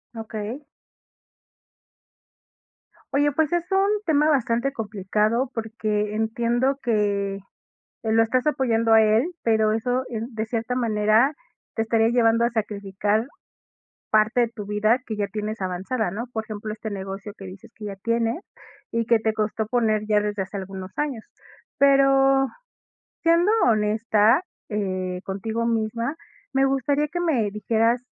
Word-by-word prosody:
Okey. 220 +4 -5 2.5
Oye, 290 +1 +3
pues, 315 +3 0
es 345 -1 +1
un 390 +1 +3 0.2
tema 300 -2 +3
bastante 255 -1 +1
complicado, 215 +3 0
porque 215 -2 -2
entiendo 235 +4 0
que 200 -4 0 0.7
que 220 - +1
lo 225 0 +5
estás 250 +4 +1
apoyando 230 -6 +1
a 220 0 +8
él, 220 +10 +3
pero 220 -1 +3
eso, 245 +3 0
eh, 225 -3 -3
de 220 -2 -3
cierta 230 +2 -2
manera, 225 +3 +3 0.4
te 225 - 0
estaría 225 0 +2
llevando 230 -1 +3
a 235 - +3
sacrificar 210 +1 -1 0.8
parte 215 +3 +3
de 235 - +1
tu 210 -3 -7
vida 215 +4 +2
que 220 - -5
ya 205 -1 0
tienes 215 +1 -5
avanzada, 190 +3 -2
¿no? 235 +4 -5
Por 220 -1 -3
ejemplo, 215 0 -6
este 220 0 -6
negocio 195 +1 -6
que 195 - -11
dices 190 +4 -11
que 210 -2 -8
ya 200 -1 -6
tienes, 230 - -1 0.5
y 230 0 0
que 230 0 +4
te 220 0 0
costó 215 0 -1
poner 220 -3 +1
ya 210 -1 +3
desde 205 -1 -2
hace 190 +2 -7
algunos 190 0 -7
años. 280 -7 -2 0.5
Pero, 270 -1 +5 0.8
siendo 335 +4 +4
honesta, 215 - +3 0.3
eh, 185 -3 -3
contigo 220 +4 -3
misma, 230 +4 -1 0.4
me 270 0 +3
gustaría 280 +2 +1
que 350 +3 -3
me 255 -12 +1
dijeras 225 +3 +1
225 Hz, 145 wpm, -24 LUFS, 210-245 Hz, 2.5 s, a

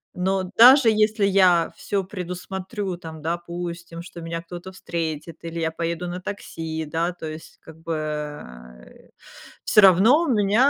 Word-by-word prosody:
Но 185 0 -1
даже 250 +1 +8
если 215 0 +2
я 185 -4 +4
всё 200 -2 -2
предусмотрю, 190 +1 -5
там, 160 -2 -9
допустим, 170 0 -5
что 170 -1 -10
меня 165 0 -4
кто-то 175 +2 -9
встретит 165 -3 -5
или 165 0 -5
я 160 0 -1
поеду 170 +2 -3
на 180 - -5
такси, 160 -4 -5
да, 165 +4 -1
то 165 -2 -8
есть, 155 +1 -10
как 160 - -13
бы, 165 0 -4
э, 145 - -7 0.5
всё 210 - +5
равно 220 - +6
меня 220 +2 +3
175 Hz, 145 wpm, -23 LUFS, 160-195 Hz, 0.5 s, даже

